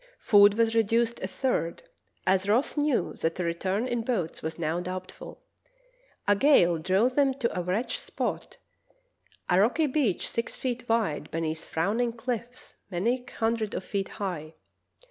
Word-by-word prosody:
Food 205 -1 +6
was 225 0 +2
reduced 230 +1 +2
a 190 - -3
third, 190 -6 -2 0.4
as 190 +1 +2
Ross 235 +7 +2
knew 295 -3 +1
that 165 +2 -1
a - - 0
return 185 +7 -1
in 240 -2 -1
boats 220 -9 -2
was 160 +1 -4
now 165 0 -1
doubtful. 185 +1 -7 0.8
A 205 - +5
gale 185 - +4
drove 190 +9 +2
them 275 -2 +3
to 250 -4 -2
a 180 - 0
wretched 185 +7 -1
spot, - - -4 0.9
a 180 - +3
rocky 245 +10 +3
beach 260 - 0
six 230 - -3
feet 245 -2 -4
wide 200 -10 0
beneath 160 0 -3
frowning 220 +8 0
chffs 240 +1 -5 0.2
many 230 +8 0
hundreds 225 -2 0
of - - -3
feet 195 0 -2
high. 165 -6 -5
210 Hz, 150 wpm, -27 LUFS, 180-240 Hz, 0.9 s, Food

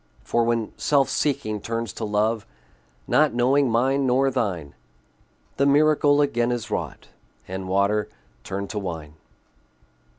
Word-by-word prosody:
For 120 - +1
when 115 -2 0
self 140 -2 +2
seeking 110 -8 -1
turns 115 -2 -3
to 110 - -4
love, 105 +1 0 0.6
Not 150 -4 +3
knowing 130 +3 +3
mine 130 +4 +2
nor 135 +2 +3
thine, 95 - -2 0.8
The 140 - +3
miracle 145 0 +4
again 120 -4 +1
is 120 -3 -4
wrought, - - -4 0.4
And 95 0 -5
water 100 +2 +1 0.3
turned 100 +1 -5
to 105 - -3
wine. 80 -6 -6
115 Hz, 130 wpm, -24 LUFS, 105-135 Hz, 0.8 s, miracle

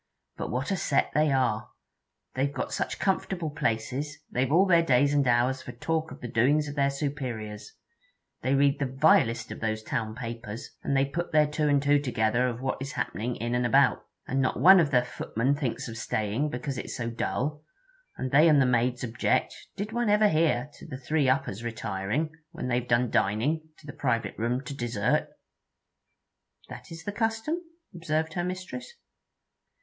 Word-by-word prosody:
'But - - -4
what 130 - -2
a 195 - +1
set 140 - +1
they 150 0 +3
are! 125 -5 +1 0.6
They've 135 +2 0
got 130 - -4
such - - -2
comfortable 185 -4 -1
places, 130 +3 -2
they've 130 +2 0
all 180 +5 +5
their 170 -3 +5
days 140 -2 +3
and 140 -2 +2
hours 125 +2 +2
for 125 - -8
talk 160 +6 -2
of - - -11
the 120 - -4
doings 140 +7 +2
of 145 - -5
their 140 -1 +2
superiors. 130 -7 -4 0.7
They 130 +1 +1
read 140 0 +3
the 140 - 0
vilest 125 -4 +3
of - - -6
those 110 0 -2
town 110 0 -3
papers, 115 -2 -6
and 140 - 0
they 135 - +3
put 170 +5 -4
their 155 -1 +5
two 150 0 0
and 140 -1 +3
two 145 0 +4
together 120 -2 +1
of 120 0 -4
what 130 0 -2
is 135 +1 -5
happening 120 +3 -2
in 120 +1 -3
and 125 0 +1
about. 135 +2 +3 0.2
And 135 +1 0
not 130 - 0
one 190 +2 +8
of 160 -4 +3
the 125 -3 +3
footmen 125 +1 -1
thinks 140 -5 -3
of 115 -1 -7
staying, 110 +6 -1
because 125 0 -4
it - - -6
's - - -5
so 120 -2 -3
dull; 145 +6 -2 0.5
and 130 - -3
they 155 +4 +6
and 150 -2 +5
the 135 - +5
maids 125 +1 +1
object 120 -1 0 0.2
did 205 +2 -4
one 235 -1 0
ever 210 0 +5
hear? 150 -5 +1
to - - -11
the 130 - -6
three 140 +1 +1
uppers 130 -5 0
retiring, 115 +5 -2 0.2
when 125 - -5
they 120 0 +2
've 125 - -9
done 120 0 +2
dining, 145 +11 +1
to - - -18
the 145 - -8
private 120 -4 -1
room 120 +4 -1
to 140 - -6
dessert.' 120 -6 0 1.4
'That - - -10
is 165 0 -8
the 205 - -3
custom?' 225 +9 -1 0.3
observed 160 -2 -2
her 175 - -1
mistress. 185 - -5
135 Hz, 190 wpm, -27 LUFS, 120-155 Hz, 1.4 s, one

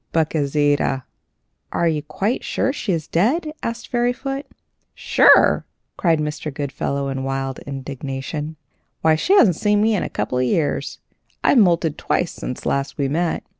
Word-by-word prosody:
But 160 -1 +1
Gauzita 145 -2 +1 0.3
" - - -50
"Are 170 - +1
you 155 -2 0
quite 190 - -2
sure 265 - 0
she 230 - -3
is 165 -4 -1
dead?" 300 - +1
asked 230 0 -4
Fairyfoot. 255 +3 -1 0.5
"Sure!" - - +5 0.3
cried 165 -3 +2
Mr. 150 0 -3
Goodfellow, 140 0 -3
in 135 -1 -3
wild 135 0 -3
indignation, 140 +3 -5 0.5
"why, 160 - +4
she 350 - +2
hasn't 185 - +5
seen 210 0 +2
me 220 0 +3
for 195 - 0
a - - -4
couple 125 - -2
of - - +2
years. 145 +4 -1 0.5
I've 265 - +5
moulted 170 -6 +2
twice 175 - 0
since 125 - -6
last 140 0 -1
we 140 -2 0
met. 165 +3 -1
155 Hz, 160 wpm, -21 LUFS, 140-205 Hz, 0.5 s, Sure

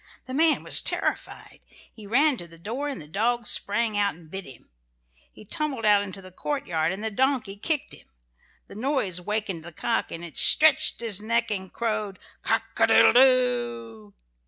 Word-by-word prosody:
The 255 - -9
man 315 +3 +2
was - - +5
terrified. - - -4 0.3
He 215 -3 -13
ran 280 +7 +2
to 175 - -9
the 165 0 -17
door 240 - -5
and 275 - -6
the 155 - -11
dog 230 +7 -2
sprang 215 +2 +1
out 200 -1 0
and 160 -2 -19
bit 195 0 -6
him. 130 - -16 0.6
He - - -16
tumbled 280 -2 -3
out 205 -1 +4
into 195 -1 -9
the 185 - -13
courtyard 175 - -3
and 195 +3 -7
the 220 - -3
donkey 255 -3 -1
kicked 290 +7 -3
him. - - -16 0.6
The - - -15
noise 215 - -1
wakened 210 -4 -4
the 170 - -11
cock 225 +7 -3
and 165 +1 -8
it 170 - -2
stretched 305 -6 +7
its 210 -4 -2
neck 230 +1 -1
and 190 -2 -4
crowed 215 -4 -4 0.2
"Cock - - 0 0.2
a - - +4
doodle - - +5
doo!" 120 - +1
210 Hz, 180 wpm, -24 LUFS, 180-250 Hz, 0.6 s, stretched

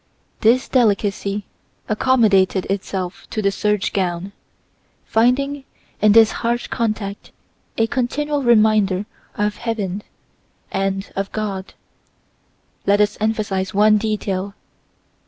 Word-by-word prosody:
This 240 +3 +3
delicacy 205 -4 +1 0.4
accommodated 210 -5 +3
itself 190 -2 -4
to - - -4
the 200 -2 +2
serge 210 0 0
gown, 185 0 -2 0.7
finding 270 +5 +1 0.4
in 210 0 +5
this 225 0 +7
harsh 240 +1 0
contact 215 -4 -3 0.5
a 225 - +3
continual 285 +4 -1
reminder 215 -5 +3 0.3
of 210 0 -1
heaven 210 -4 -3 0.7
and 195 0 -2
of 195 0 -3
God. 200 -3 -4 1.1
Let 200 +1 +4
us 210 0 +2
emphasize 205 -4 -1
one 210 +1 +5
detail. 200 -2 -2
210 Hz, 100 wpm, -20 LUFS, 195-225 Hz, 1.1 s, this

